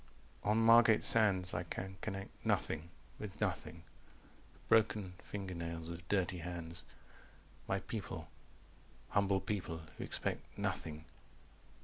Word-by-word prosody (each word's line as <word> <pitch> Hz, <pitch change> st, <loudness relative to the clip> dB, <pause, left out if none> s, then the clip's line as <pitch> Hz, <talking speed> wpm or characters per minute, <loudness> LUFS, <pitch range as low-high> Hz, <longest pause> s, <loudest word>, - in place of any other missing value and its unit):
"On 105 Hz, +1 st, +3 dB
Margate 115 Hz, -1 st, +7 dB
Sands. 95 Hz, -5 st, +5 dB
300 85 Hz, -, -1 dB
I 85 Hz, -, -9 dB
can 95 Hz, 0 st, -5 dB
connect 95 Hz, -2 st, -4 dB
Nothing 80 Hz, +2 st, 0 dB, 0.3 s
with 105 Hz, -3 st, -7 dB
nothing. 85 Hz, -1 st, -2 dB, 0.7 s
The -, -, -23 dB
broken 105 Hz, -4 st, +3 dB
fingernails 85 Hz, -4 st, -4 dB
of 85 Hz, +1 st, -9 dB
dirty 95 Hz, -3 st, +1 dB
hands. 85 Hz, -1 st, -3 dB, 0.8 s
My -, -, 0 dB
people -, -, -5 dB, 0.8 s
humble 100 Hz, -1 st, +3 dB
people 90 Hz, -5 st, -3 dB, 0.2 s
who -, -, -2 dB
expect -, -, 0 dB, 0.2 s
Nothing." 80 Hz, 0 st, -3 dB
95 Hz, 115 wpm, -36 LUFS, 85-105 Hz, 0.8 s, Margate